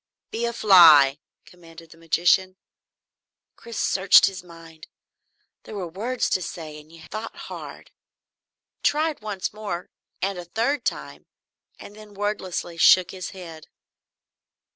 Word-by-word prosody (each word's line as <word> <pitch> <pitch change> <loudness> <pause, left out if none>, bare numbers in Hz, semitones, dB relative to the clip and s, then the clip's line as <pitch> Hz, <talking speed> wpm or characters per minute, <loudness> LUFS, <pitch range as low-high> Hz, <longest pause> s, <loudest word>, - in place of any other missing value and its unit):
"Be 230 +1 -2
a 235 - -2
fly!" 160 - +6 0.3
commanded 165 -2 -16
the - - -16
magician. 175 +3 +1 1.0
Chris 235 -1 -10
searched 195 0 +5
his 190 -2 -4
mind. 165 -2 -15 0.7
There 215 - -11
were 190 -3 -4
words 225 +9 -3
to 185 - +1
say, 155 -3 -8
and 150 +1 -18
you 165 -1 -15
thought 215 +7 -7
hard. - - -10 0.9
He - - -50
tried 310 -1 0
once 205 -3 -5
more, 205 -5 -6 0.3
and 195 -1 -3
a 175 - -8
third 235 +10 -2
time, - - -5 0.5
and 205 - -13
then 210 -1 -15
wordlessly 195 -4 -4
shook 185 +1 +5
his 185 -1 -7
head. 165 -5 -11
185 Hz, 135 wpm, -23 LUFS, 165-210 Hz, 1.0 s, fly